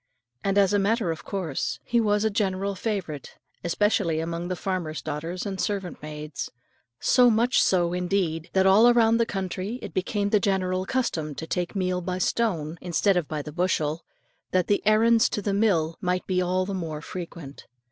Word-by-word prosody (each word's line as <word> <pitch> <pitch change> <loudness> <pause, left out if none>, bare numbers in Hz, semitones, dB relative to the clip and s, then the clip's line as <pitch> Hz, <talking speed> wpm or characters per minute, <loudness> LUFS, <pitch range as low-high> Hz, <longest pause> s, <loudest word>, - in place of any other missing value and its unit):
And, 195 0 +1
as 200 0 +4
a 205 - +4
matter 205 -2 +1
of 160 - -6
course, 175 -8 -3
he 235 -1 +1
was 210 -1 +2
a 220 - +2
general 200 -1 0
favourite, 190 -8 -4 0.3
especially 175 -2 +1
among 170 +1 -3
the 185 - -2
farmer's 175 -4 -3
daughters 165 +5 -4
and 195 -2 -3
servant 195 -4 -3
maids; 150 -1 -6 0.5
so 250 -1 +5
much 235 +3 +3
so 175 -2 +2
indeed, 180 -3 -1
that 190 0 +3
all 215 +5 +7
round 230 -1 +4
the 230 - +2
country 195 +3 -3
it - - -7
became 200 +2 -1
the 210 - +5
general 185 -1 0
custom 160 - -1
to 160 - -5
take 175 +4 -3
meal 185 -1 0
by 180 +1 -3
the 185 - -3
stone, 170 -10 0
instead 180 +3 +2
of 175 -4 0
by 150 -2 -4
the 150 - -7
bushel, 165 -2 0 0.5
that 185 -1 +2
the 205 - +1
"errands 225 +1 +5
to - - -2
the 200 0 -1
mill" 175 -6 +2
might 180 0 -1
be 185 -1 +1
all 185 +1 0
the 200 - -4
more 160 -5 -4
frequent. 165 -6 -8
185 Hz, 190 wpm, -26 LUFS, 165-205 Hz, 0.5 s, all